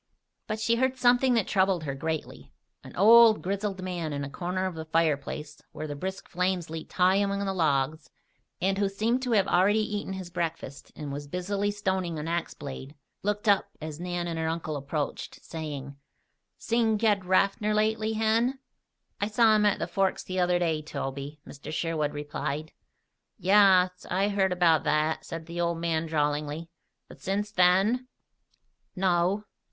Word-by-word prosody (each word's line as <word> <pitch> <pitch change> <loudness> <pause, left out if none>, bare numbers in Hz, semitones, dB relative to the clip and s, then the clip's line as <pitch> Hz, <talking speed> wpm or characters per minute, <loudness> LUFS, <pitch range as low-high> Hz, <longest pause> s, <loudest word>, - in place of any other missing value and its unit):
But 215 0 -3
she 230 +2 +2
heard 260 +1 +1
something 250 0 +4
that 225 -5 +2
troubled 190 -4 +2
her 140 -3 -3
greatly. 160 +3 -5 0.3
An - - -12
old, 225 +2 +7
grizzled 195 0 -2
man 175 -4 -3
in 140 0 -3
a 140 - -6
corner 185 +3 -2
of 185 - -2
the 160 -1 -6
fireplace 155 -1 -1
where 155 - -5
the 145 -1 -5
brisk 190 +6 -5
flames 180 -2 -1
leaped 160 -1 -7
high 185 +1 +4
among 200 0 0
the 195 - -1
logs, 150 -3 0 0.5
and 195 +2 0
who 200 -1 +2
seemed 225 +6 0
to 250 -2 -1
have 200 -3 +3
already 190 +4 +4 0.2
eaten 205 -2 -4
his 185 -2 -7
breakfast 165 -5 -4
and 145 -3 -6
was 145 +1 -6
busily 195 +5 -2
stoning 190 -5 -2
an 150 +1 -4
axe 170 0 -2
blade, 135 - -8 0.3
looked 210 +2 -2
up 200 -2 +4
as 155 -1 -7
Nan 175 0 -3
and 165 -1 -3
her 160 - -1
uncle 160 -1 -3
approached, 145 +1 -4
saying: 145 -4 -6 0.6
"Seen 230 -2 +1
Ged 205 -3 +2
Raffer 195 +3 +2
lately, 215 +1 +1
Hen?" 225 +4 +1 0.6
"I 205 - 0
saw 220 0 +4
him 210 -1 +4
at 205 - +2
the - - -2
Forks 195 -1 0
the 185 0 -3
other 180 0 +3
day, 165 -3 0
Toby," 140 0 -5
Mr. 140 +2 -9
Sherwood 155 -2 -1
replied. 145 +1 -4 0.7
"Yaas. 185 -1 +4
I 195 +3 +1
heard 195 -2 +1
about 170 -3 +3
that," 155 +1 +1
said 165 -1 -6
the 170 +1 -4
old 170 -1 0
man 165 -1 -1
drawlingly. 150 +1 -1 0.4
"But - - -15
since 205 +2 -2
then?" 195 +7 +3 0.9
"No." 185 +2 +1
180 Hz, 170 wpm, -27 LUFS, 155-205 Hz, 0.9 s, old